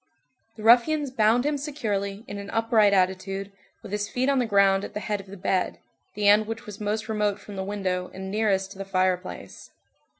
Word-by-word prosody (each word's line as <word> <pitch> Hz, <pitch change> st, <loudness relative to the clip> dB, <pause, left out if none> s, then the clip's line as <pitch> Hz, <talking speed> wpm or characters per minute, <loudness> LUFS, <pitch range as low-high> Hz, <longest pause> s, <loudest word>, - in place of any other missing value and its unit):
The 215 Hz, -, -10 dB
ruffians 255 Hz, +5 st, +4 dB
bound 230 Hz, +1 st, +3 dB
him 295 Hz, -1 st, 0 dB
securely, 210 Hz, -8 st, -3 dB
in 200 Hz, -, -6 dB
an 200 Hz, 0 st, -8 dB
upright 225 Hz, -2 st, +3 dB
attitude, 195 Hz, +1 st, 0 dB, 0.3 s
with 195 Hz, -, -9 dB
his 205 Hz, 0 st, -2 dB
feet 255 Hz, +2 st, 0 dB
on 275 Hz, -1 st, +3 dB
the 245 Hz, -, 0 dB
ground 200 Hz, -2 st, +4 dB
at -, -, -8 dB
the -, -, -1 dB
head 210 Hz, 0 st, -2 dB
of 195 Hz, -, -18 dB
the 200 Hz, +1 st, -10 dB
bed, 185 Hz, 0 st, 0 dB, 0.4 s
the 205 Hz, 0 st, +1 dB
end 210 Hz, +1 st, +5 dB
which 225 Hz, 0 st, -5 dB
was 210 Hz, 0 st, -9 dB
most 215 Hz, +1 st, -2 dB
remote 210 Hz, -2 st, 0 dB
from 205 Hz, -, -10 dB
the 190 Hz, -, -3 dB
window, 190 Hz, -2 st, -2 dB
and 190 Hz, 0 st, -7 dB
nearest 195 Hz, -2 st, 0 dB
to 195 Hz, -, -12 dB
the -, -, -3 dB
fireplace. 185 Hz, -1 st, -2 dB
205 Hz, 205 wpm, -25 LUFS, 195-225 Hz, 0.4 s, end